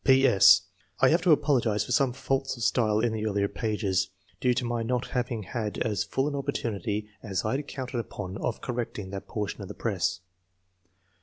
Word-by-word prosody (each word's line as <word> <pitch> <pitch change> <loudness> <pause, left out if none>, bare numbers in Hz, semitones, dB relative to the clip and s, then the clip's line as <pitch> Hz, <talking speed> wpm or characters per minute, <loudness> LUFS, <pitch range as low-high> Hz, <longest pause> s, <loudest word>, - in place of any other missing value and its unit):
— - - -10 0.9
I - - +6
have 165 +3 +3
to 180 - +4
apologise 120 -9 +3
for - - -7
some 135 -3 +3
faults 135 +1 -1
of 120 - -5
style 110 -2 +2
in 115 -1 +1
the 110 0 -2
earlier 100 -1 +1
pages, 100 -5 -1 0.3
due 125 -1 +2
to 125 - -1
my 120 -1 -1
not 125 +2 -1
having 120 -3 -2
had 105 +2 -4
as 105 -4 0
full 135 +2 -1
an 150 - -2
opportunity 110 -6 -2
as 95 -4 -2
I 110 +5 +1
had 145 0 -6
counted 130 -3 -4
upon 95 -4 -5
of - - -2
correcting 115 -6 -4
that 100 -1 -6
portion 105 -2 -4
of - - -6
the - - -8
press. 90 - -1
115 Hz, 190 wpm, -28 LUFS, 105-130 Hz, 0.9 s, I